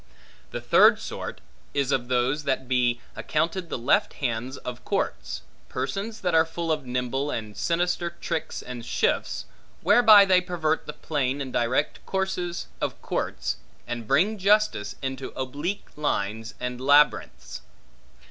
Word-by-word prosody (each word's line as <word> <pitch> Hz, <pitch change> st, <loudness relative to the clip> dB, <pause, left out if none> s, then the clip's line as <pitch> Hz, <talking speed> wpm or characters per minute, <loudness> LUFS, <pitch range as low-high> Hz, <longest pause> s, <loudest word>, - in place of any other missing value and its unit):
The -, -, -5 dB
third -, -, +6 dB
sort, -, -, -6 dB, 0.3 s
is 140 Hz, -1 st, +1 dB
of 120 Hz, -3 st, 0 dB
those 130 Hz, +4 st, +1 dB
that 135 Hz, -1 st, +1 dB
may 130 Hz, -, -18 dB
be 120 Hz, -2 st, +2 dB
accounted 170 Hz, +1 st, -1 dB
the -, -, -2 dB
left 120 Hz, +3 st, +2 dB
hands 125 Hz, 0 st, -3 dB
of 125 Hz, -1 st, -7 dB
courts; -, -, -2 dB, 0.3 s
persons 200 Hz, -, -3 dB
that 180 Hz, -2 st, 0 dB
are 160 Hz, 0 st, +6 dB
full 165 Hz, 0 st, -3 dB
of 150 Hz, -4 st, -1 dB
nimble 125 Hz, +3 st, -1 dB
and 110 Hz, -6 st, -4 dB
sinister 175 Hz, -, 0 dB
tricks 165 Hz, -2 st, -3 dB
and 125 Hz, -2 st, -7 dB
shifts, -, -, 0 dB, 0.4 s
whereby 215 Hz, -4 st, +8 dB
they 185 Hz, -1 st, +5 dB
pervert 165 Hz, -3 st, -1 dB
the 150 Hz, -, -4 dB
plain 140 Hz, -3 st, -1 dB
and 135 Hz, -2 st, -5 dB
direct 120 Hz, +2 st, 0 dB
courses 190 Hz, -2 st, -2 dB, 0.2 s
of -, -, -2 dB
courts, -, -, -2 dB, 0.3 s
and 120 Hz, -2 st, -5 dB
bring 190 Hz, -, +3 dB
justice 200 Hz, -, +2 dB
into 130 Hz, 0 st, -4 dB
oblique 145 Hz, +10 st, -3 dB
lines 115 Hz, -6 st, -2 dB
and 125 Hz, 0 st, -4 dB
labyrinths. 145 Hz, +1 st, +3 dB
140 Hz, 145 wpm, -26 LUFS, 125-175 Hz, 0.4 s, whereby